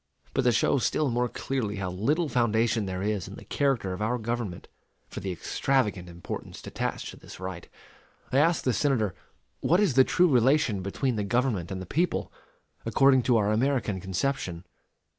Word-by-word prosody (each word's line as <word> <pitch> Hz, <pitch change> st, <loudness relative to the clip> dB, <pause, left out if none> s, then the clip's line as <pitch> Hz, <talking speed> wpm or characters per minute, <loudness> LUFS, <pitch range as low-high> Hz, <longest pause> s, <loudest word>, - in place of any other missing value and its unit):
But 135 Hz, -, +2 dB
to 125 Hz, -, +5 dB
show 120 Hz, +4 st, +2 dB
still 140 Hz, +3 st, +1 dB
more 120 Hz, +1 st, 0 dB
clearly 115 Hz, -7 st, -3 dB
how 95 Hz, -2 st, -3 dB
little 145 Hz, -, 0 dB
foundation 115 Hz, -4 st, +1 dB
there 95 Hz, 0 st, -3 dB
is 105 Hz, -4 st, -1 dB
in 100 Hz, -, -9 dB
the -, -, -12 dB
character 135 Hz, -10 st, 0 dB
of 90 Hz, -, -6 dB
our 115 Hz, +4 st, 0 dB
government 115 Hz, -5 st, -4 dB, 0.4 s
for -, -, -7 dB
the 95 Hz, -, -3 dB
extravagant 105 Hz, -1 st, -1 dB
importance 85 Hz, 0 st, -7 dB
attached -, -, -3 dB
to -, -, -10 dB
this -, -, -12 dB
right, 95 Hz, -2 st, -6 dB, 0.6 s
I 135 Hz, -, +3 dB
ask 165 Hz, +2 st, +3 dB
the 125 Hz, -, +1 dB
Senator 115 Hz, -, +1 dB, 0.5 s
what 175 Hz, +4 st, +3 dB
is 205 Hz, -9 st, +3 dB
the 130 Hz, +1 st, +7 dB
true 180 Hz, +6 st, +3 dB
relation 125 Hz, -, +3 dB
between 115 Hz, +6 st, -1 dB
the 105 Hz, -, 0 dB
government 105 Hz, -4 st, 0 dB
and 95 Hz, -, -4 dB
the 95 Hz, -, -6 dB
people, 170 Hz, -, -1 dB, 0.5 s
according 135 Hz, -1 st, +4 dB
to 120 Hz, -1 st, +3 dB
our 105 Hz, -1 st, +2 dB
American 115 Hz, -4 st, 0 dB
conception? 95 Hz, -2 st, -2 dB
115 Hz, 180 wpm, -27 LUFS, 95-135 Hz, 0.6 s, the